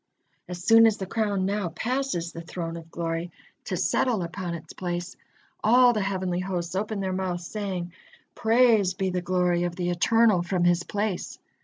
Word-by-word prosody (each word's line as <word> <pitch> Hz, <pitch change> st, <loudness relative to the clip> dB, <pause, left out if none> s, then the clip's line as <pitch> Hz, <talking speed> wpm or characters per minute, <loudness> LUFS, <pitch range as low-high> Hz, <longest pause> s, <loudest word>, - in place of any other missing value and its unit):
As 180 Hz, -1 st, -7 dB
soon 225 Hz, +2 st, +7 dB
as 220 Hz, -, +1 dB
the 190 Hz, -, -4 dB
crown 205 Hz, -2 st, -1 dB
now 200 Hz, -2 st, -1 dB
passes 225 Hz, -, -2 dB
the 165 Hz, -, -8 dB
Throne 165 Hz, 0 st, -5 dB
of 165 Hz, -1 st, -10 dB
Glory, 165 Hz, +1 st, -3 dB, 0.3 s
to -, -, -2 dB
settle 230 Hz, -8 st, +1 dB
upon 175 Hz, 0 st, -4 dB
its 170 Hz, -, -10 dB
place, 175 Hz, 0 st, -4 dB, 0.5 s
all 245 Hz, +2 st, +6 dB
the 215 Hz, -, -1 dB
heavenly 185 Hz, -2 st, -1 dB
hosts 180 Hz, -2 st, -3 dB
open 205 Hz, +1 st, -2 dB
their 190 Hz, -1 st, -2 dB
mouths, 180 Hz, -2 st, -3 dB
saying: 185 Hz, -4 st, -4 dB, 0.4 s
"Praised 220 Hz, -5 st, +3 dB
be 190 Hz, -1 st, 0 dB
the 180 Hz, 0 st, -1 dB
glory 180 Hz, -1 st, +1 dB
of 175 Hz, -1 st, -2 dB
the 175 Hz, 0 st, -1 dB
Eternal 215 Hz, +2 st, +3 dB
from 175 Hz, 0 st, -1 dB
His 175 Hz, 0 st, +3 dB
place." 205 Hz, 0 st, -3 dB
185 Hz, 175 wpm, -26 LUFS, 175-210 Hz, 0.5 s, soon